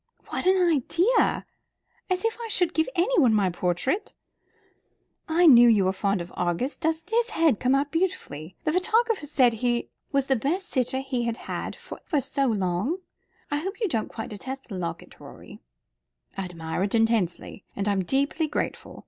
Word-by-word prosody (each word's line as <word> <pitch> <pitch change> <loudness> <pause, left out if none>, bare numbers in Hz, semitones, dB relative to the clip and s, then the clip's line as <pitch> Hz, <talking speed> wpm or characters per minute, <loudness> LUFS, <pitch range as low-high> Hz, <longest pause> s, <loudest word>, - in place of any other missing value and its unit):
"What - - -2
an 380 0 +5
idea! 340 - +2 0.6
As 370 +3 0
if 455 - +1
I 465 - -4
should 355 -5 +1
give 320 +6 +1
anyone 340 - +3
my 195 -3 +2
portrait. 180 - -1 1.1
I 340 +2 +4
knew 240 -6 +8
you 205 -4 +4
were 190 - +1
fond 195 -1 0
of 170 - -9
Argus. 175 - -1
Doesn't 320 +5 -2
his 470 +1 +2
head 320 -10 +2
come 255 +2 +2
out 280 +1 0
beautifully? 185 - -3
The 305 - 0
photographer 440 -1 +1
said 255 -5 +3
he 240 +1 -1 0.2
was 275 -2 +1
the 270 - +2
best 330 - -2
sitter 260 +1 0
he 260 -3 -2
had 235 -1 -2
had - - -5
for - - -10
ever 300 - +1
so 275 +1 -1
long. 200 - 0 0.5
I 290 - +1
hope 385 +8 -5
you 445 - +1
don't 225 - -2
quite 225 - -7
detest 260 +6 -7
the 200 - -5
locket, 170 -1 -6
Rorie." - - -12 0.8
"I 195 - -3
admire 165 -1 -4
it 200 +3 0
intensely, 225 -5 0
and 200 +1 -2
I'm 200 -2 +2
deeply 280 - 0
grateful. - - -4
265 Hz, 175 wpm, -26 LUFS, 205-330 Hz, 1.1 s, knew